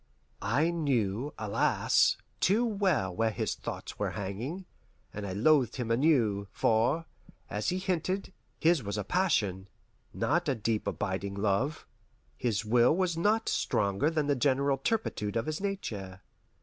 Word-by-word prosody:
I 135 +12 +2
knew, 135 - 0
alas, 105 -2 +2 0.2
too 215 +6 +3
well 185 - 0
where 115 +4 +2
his 105 - -2
thoughts - - -7
were - - 0
hanging, 115 - -4 0.5
and 105 -1 -5
I 95 - -4
loathed 125 +3 +3
him 120 -3 -3
anew; 115 -7 +2
for, 120 +9 +2 0.5
as 105 - -1
he 180 - 0
hinted, 185 +1 -2 0.3
his 165 -2 +3
was 100 -1 -4
a 105 - -1
passion, 100 - 0 0.4
not 170 -2 0
a 135 - +1
deep 110 -1 -1
abiding 100 +1 -2
love. 105 +9 0 0.5
His 110 -4 -1
will 120 +6 +4
was 185 -3 +1
not 210 +6 +1
stronger 100 +8 +1
than 155 -2 0
the 145 0 +2
general 135 +1 +2
turpitude 135 - -1
of 115 0 0
his 155 +3 -3
nature. 105 - -4
125 Hz, 145 wpm, -30 LUFS, 105-165 Hz, 0.5 s, will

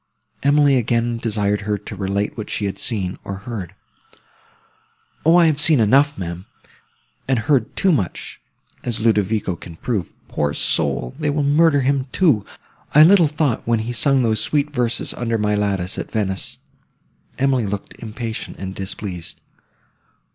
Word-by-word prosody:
Emily 145 -1 +4
again 120 0 0
desired 105 -2 0
her 105 0 -1
to 105 +1 -9
relate 100 +1 -2
what 110 -2 -6
she 105 - -2
had 100 0 -4
seen, 100 -6 -2
or 100 - -5
heard. 100 -7 -6 1.5
"O, 165 +2 +5
I 175 - +6
have 155 -3 +2
seen 150 -2 +5
enough, 140 +7 +4
ma'am, 85 0 -6 0.8
and 130 -1 +2
heard 125 -1 +1
too 195 - +3
much, 105 - -2 0.4
as 120 -2 -1
Ludovico 105 -3 +1
can 85 0 -11
prove. 100 -1 -3
Poor 75 -1 -1
soul! - - 0
they 150 - 0
will 145 0 0
murder 145 0 +4
him, 135 0 0
too! 150 - +3 0.5
I 150 - +9
little 175 -1 +6
thought, 150 -6 -1
when 115 -1 +3
he 120 +2 -4
sung 135 +3 +2
those 110 -2 +1
sweet 150 0 0
verses 120 -3 0
under 115 -2 -1
my 105 -1 0
lattice, 100 -3 -1
at - - -5
Venice!"—Emily 110 +4 -3
looked 100 0 -5
impatient 115 0 -6
and 95 0 -6
displeased. 95 -3 -5
115 Hz, 150 wpm, -20 LUFS, 100-140 Hz, 1.5 s, I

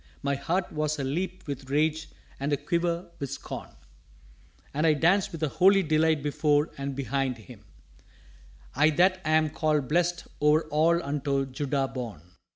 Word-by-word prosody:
My 140 0 +1
heart 165 +7 -1
was 155 0 -1
a 140 - -3
leap 180 +7 -3
with 140 -2 -6
rage 155 +2 0 0.3
and 140 +2 -2
a 145 - +2
quiver 170 +3 -2
with 140 - -4
scorn. - - -7 1.0
And 150 +3 +1
I 155 - +5
danced 175 +6 +2
with 165 -1 -6
a - - +3
holy 195 +5 +4
delight 155 -1 +2
before 145 +1 +1
and 140 0 -4
behind 135 -1 -1
him 110 -5 -14 1.1
I 145 +4 +4
that 185 +4 +3
am 155 -1 +2
called 150 -4 0
blessèd 175 +2 +1 0.2
o'er 150 +2 +4
all 165 +3 +2
unto 140 -1 -1
Judah 135 +1 -1
born. 120 - -6
150 Hz, 160 wpm, -27 LUFS, 140-165 Hz, 1.1 s, I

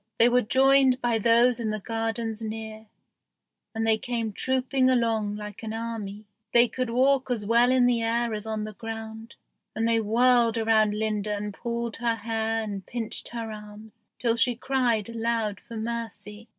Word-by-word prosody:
They 235 +1 +6
were 250 +1 +3
joined 265 +2 +4
by 235 -2 +1
those 235 +2 +4
in 225 -2 -2
the 215 0 -2
gardens 225 +1 -3
near, 220 0 -6 0.9
and 225 0 -1
they 220 -1 +3
came 230 -3 -3
trooping 260 +2 +1
along 225 -4 +1
like 210 -1 -8
an 220 -1 -5
army. 220 -2 -5 0.3
They 240 +1 +7
could 255 0 -3
walk 260 +2 +2
as 230 -4 -1
well 235 +3 +4
in 255 -1 +4
the 240 -2 +2
air 230 0 0
as 215 +1 -5
on 220 -1 -2
the 215 0 -6
ground; 225 +1 -8 0.4
and 225 +1 0
they 230 -1 +3
whirled 235 +1 +3
around 220 -2 +3
Linda 210 -1 -1
and 205 0 -5
pulled 235 +1 -4
her 235 -1 0
hair 225 0 -2
and 200 -3 -5
pinched 230 0 -3
her 230 -2 -5
arms, 215 +1 -12
till 230 0 +1
she 240 +1 +2
cried 240 -4 0
aloud 230 -3 -2
for 230 - -7
mercy. 220 -1 -6
225 Hz, 175 wpm, -26 LUFS, 215-235 Hz, 0.9 s, They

